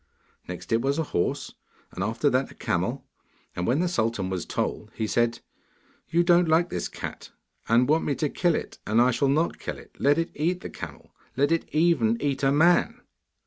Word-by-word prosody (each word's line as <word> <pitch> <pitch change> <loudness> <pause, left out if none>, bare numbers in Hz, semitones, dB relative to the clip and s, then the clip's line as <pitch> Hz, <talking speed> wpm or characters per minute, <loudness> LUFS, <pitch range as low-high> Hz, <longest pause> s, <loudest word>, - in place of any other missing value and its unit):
Next - - -8
it 115 +1 +3
was 140 +3 0
a 160 - +1
horse, 85 - -1 0.4
and 95 - -4
after 115 +7 0
that 130 +1 +1
a - - -14
camel, - - -2 0.5
and 90 - -2
when 135 +7 +2
the 180 - +1
sultan 110 - -1
was 90 -2 -3
told - - -3
he 110 - -1
said, 120 +2 0 0.7
'You 170 +2 +3
don't 175 0 +4
like 170 +2 +3
this - - -2
cat, - - -7 0.4
and 120 +2 +4
want 155 +3 +2
me 145 - 0
to 150 - 0
kill 175 +3 +1
it. - - -5
And 110 +2 +3
I 125 +1 +5
shall 140 +3 +1
not 155 +5 +1
kill - - -5
it. - - -16
Let 145 +2 +3
it 165 0 -1
eat 175 +4 -1
the - - -7
camel: - - -9 0.3
let 145 +3 +2
it 165 - 0
even 150 -9 +2
eat 140 -2 -1
a 135 -1 +3
man. 165 +5 +3
140 Hz, 205 wpm, -26 LUFS, 115-165 Hz, 0.7 s, I